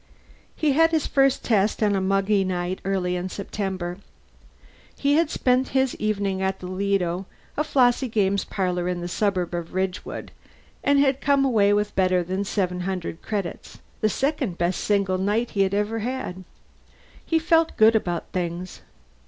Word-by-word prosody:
He 305 -2 +1
had 325 +4 +5
his 320 -2 0
first 275 -1 +2
test 215 -1 +1
on 205 -1 +3
a 195 - 0
muggy 195 +1 +2
night 180 0 -2
early 185 -2 -1
in 180 +1 -3
September. 190 -2 -4 1.0
He 280 0 +2
had 320 +1 +3
spent 255 -3 +1
his 265 -1 +2
evening 200 -3 -1
at 190 0 0
the 185 - -10
Lido, 185 -1 -1 0.3
a 300 - +1
flossy 255 -2 +3
games 200 -3 +1
parlor 180 -3 -2
in 180 -1 -2
the 175 - -4
suburb 185 -2 -1
of 170 0 -5
Ridgewood, 185 -1 -3 0.5
and 285 0 +3
had 275 -1 +2
come 280 -1 +3
away 210 -6 +3
with 205 0 0
better 185 -1 +2
than 185 +3 -2
seven 180 -3 -1
hundred 180 -2 -4
credits 200 -5 -5 0.2
the 215 - +2
second 265 - -1
best 175 +1 -1
single 195 -3 +1
night 210 +5 0
he 200 - 0
had 195 0 +2
ever 210 +2 0
had. 220 -6 -4 0.8
He 325 - +1
felt 325 0 +2
good 220 +1 +6
about 175 -5 -1
things. 175 0 -4
200 Hz, 165 wpm, -24 LUFS, 185-240 Hz, 1.0 s, good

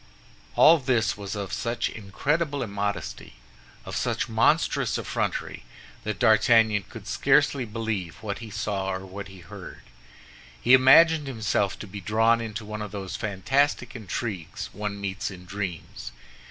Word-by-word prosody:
All 165 +1 +7
this 125 -5 +1
was 100 0 -6
of 100 -2 -5
such 115 +1 -1
incredible 140 +9 -1
immodesty, 100 -3 -4 0.5
of - - -6
such - - -1
monstrous - - +2
effrontery, - - -3 0.4
that 110 -2 -2
D'Artagnan 110 -1 +4
could - - -10
scarcely 135 -3 +2
believe 105 -6 -3
what 100 -2 -3
he 115 -2 -8
saw 100 -2 -2
or 95 0 -4
what 100 +2 -7
he 95 -2 -13
heard. 80 - -11 0.8
He 125 - +4
imagined 145 +4 +7
himself 110 -5 0
to - - -7
be 100 0 -8
drawn 115 +4 +3
into 110 -1 -5
one 105 0 -6
of 105 - -5
those 100 -2 -5
fantastic 120 +5 0
intrigues 100 -5 -5
one 105 -1 -4
meets 100 0 -3
in 90 -2 -11
dreams. 95 -3 -6
105 Hz, 140 wpm, -26 LUFS, 100-115 Hz, 0.8 s, All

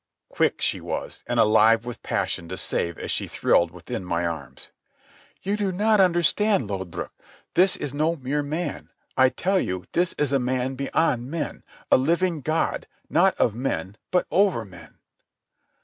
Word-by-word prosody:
Quick - - 0
she - - +1
was, - - -5
and - - 0
alive 110 +2 +5
with 120 -1 -7
passion 85 - -2
to 95 - -5
save 85 -1 -1
as - - -4
she - - -1
thrilled 85 - +2
within 90 +2 -6
my 85 -1 -1
arms. 80 -6 -6 0.7
"You 200 +2 0
do 205 -2 -1
not 210 +3 +2
understand, 180 - +3
Lodbrog. 95 -4 -5 0.4
This 185 +1 +4
is 140 - -5
no 155 +3 +1
mere 145 0 -2
man. 150 +1 -4 0.3
I 130 0 +5
tell 190 +7 0
you 90 - -3
this 175 0 +1
is 145 -2 -1
a 135 - +4
man 130 +1 -1
beyond 135 -2 0
men—a 160 0 -1
living 170 +4 +1
God, 155 +5 -1 0.2
not 185 +4 +4
of 110 - +2
men, 115 -5 -3
but 180 - +2
over 185 - +2
men." 85 -5 -14
135 Hz, 160 wpm, -24 LUFS, 105-175 Hz, 0.7 s, alive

